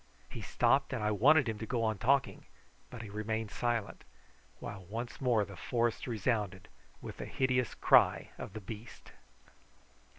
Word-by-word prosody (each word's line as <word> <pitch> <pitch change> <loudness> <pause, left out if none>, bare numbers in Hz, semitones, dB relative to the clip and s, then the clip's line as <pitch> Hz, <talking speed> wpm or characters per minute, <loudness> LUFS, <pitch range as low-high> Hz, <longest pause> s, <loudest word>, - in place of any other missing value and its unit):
He - - -6
stopped, 135 +3 +2
and 115 -4 -2
I 105 - +2
wanted 135 +7 +5
him 110 -2 -3
to 110 - -4
go 120 -1 0
on 110 -3 0
talking, 135 +5 +1 0.4
but 115 - -8
he 110 - -8
remained 110 +1 -3
silent, 120 -4 -2 0.6
while 100 -2 -7
once 115 +7 -6
more 120 -5 +3
the 100 - -10
forest 120 0 -1
resounded 105 -4 -1 0.3
with - - -7
the - - -5
hideous 125 -3 0
cry - - +4
of - - -7
the 110 - -6
beast. 110 +3 -10
115 Hz, 160 wpm, -32 LUFS, 105-125 Hz, 0.6 s, wanted